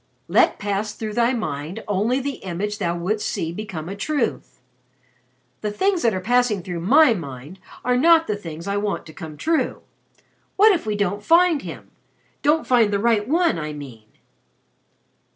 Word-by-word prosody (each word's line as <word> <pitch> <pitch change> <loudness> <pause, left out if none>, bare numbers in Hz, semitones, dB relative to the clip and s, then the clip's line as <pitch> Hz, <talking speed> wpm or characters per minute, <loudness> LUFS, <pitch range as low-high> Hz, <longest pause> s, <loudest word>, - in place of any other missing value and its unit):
"'Let - - +3
pass 205 +1 -2
through 215 -1 -5
thy 235 +2 +2
mind 160 - -4
only 210 +6 +1
the 275 0 -4
image 195 +3 -4
thou 175 -3 -1
wouldst 210 +5 -1
see 160 - -3
become 175 -4 -6
a 195 - -5
truth.' 270 +4 -2 1.0
The 210 - -1
things 370 - 0
that 230 - +3
are - - -1
passing 235 -2 +1
through 175 -1 -5
my 255 - +5
mind 145 - -8 0.3
are 250 0 +2
not 325 +5 +5
the 210 - -1
things 165 -3 -8
I 200 0 -1
want 205 0 -2
to 160 - -12
come 155 -4 -9
true. 320 - -1 0.7
What 425 +3 +6
if 345 - -1
we 210 - 0
don't 205 0 -1
find 335 +1 +4
him - - -9 0.5
don't 305 +2 +2
find 235 -5 +3
the 200 - +1
right 215 0 +1
one, 330 - +2
I 150 -1 -4
mean!" 125 -7 -10
210 Hz, 170 wpm, -22 LUFS, 175-250 Hz, 1.0 s, What